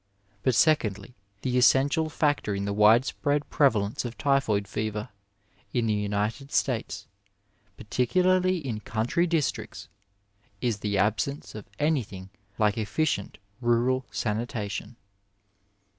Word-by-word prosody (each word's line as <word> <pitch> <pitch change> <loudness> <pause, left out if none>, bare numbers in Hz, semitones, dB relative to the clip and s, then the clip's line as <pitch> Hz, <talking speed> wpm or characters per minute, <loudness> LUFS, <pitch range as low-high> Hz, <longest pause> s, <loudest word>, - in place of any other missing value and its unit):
But, 125 +3 +2
secondly, 110 - +2 0.3
the 125 -1 +1
essential 145 +5 +4
factor 145 -9 0
in 100 0 -2
the 100 - -1
widespread 125 +7 +3
prevalence 110 -8 +2
of 120 -1 -6
typhoid 115 -8 +1
fever 105 +3 -3 0.6
in 120 -2 +1
the 110 - +1
United 105 +6 -2
States, - - -1 0.7
particularly 185 - +2
in 130 -9 -4
country 115 - 0
districts, 165 -4 -2 0.7
is 115 -3 -1
the 100 0 -1
absence 110 +8 -1
of 105 -2 -9
anything 110 -11 -1 0.3
like 105 +1 +2
efficient 110 0 -1 0.2
rural 120 +2 +1
sanitation. 110 0 -3
120 Hz, 110 wpm, -27 LUFS, 105-140 Hz, 0.7 s, essential